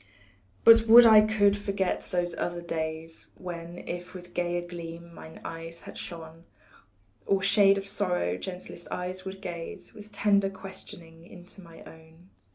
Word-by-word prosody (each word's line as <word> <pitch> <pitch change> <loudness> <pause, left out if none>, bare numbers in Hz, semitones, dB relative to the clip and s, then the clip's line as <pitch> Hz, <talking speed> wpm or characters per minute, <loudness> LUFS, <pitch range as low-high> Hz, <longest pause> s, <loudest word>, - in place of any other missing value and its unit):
But 230 0 +7
would 235 +2 +10
I 220 -2 +9
could 210 -2 +3
forget 200 -2 -2
those 175 -1 -1
other 175 +1 -3
days 160 -1 -5
When 175 -1 -8
if 175 +1 -6
with 180 -1 -10
gayer 175 0 -1
gleam 170 -1 -9
mine 160 0 -12
eyes 165 0 -8
had - - -10
shone, 165 0 -9 0.8
Or 195 -1 +2
shade 195 0 +5
of 195 0 -5
sorrow, 180 - -1
gentlest 180 - -8
eyes 185 +1 -5
would 190 0 -7
gaze 170 -3 -7
With 210 0 -12
tender 200 -1 +2
questioning 180 -4 -11
into 180 +2 -13
my 165 -2 -14
own. 160 +3 -17
180 Hz, 150 wpm, -28 LUFS, 165-195 Hz, 0.8 s, would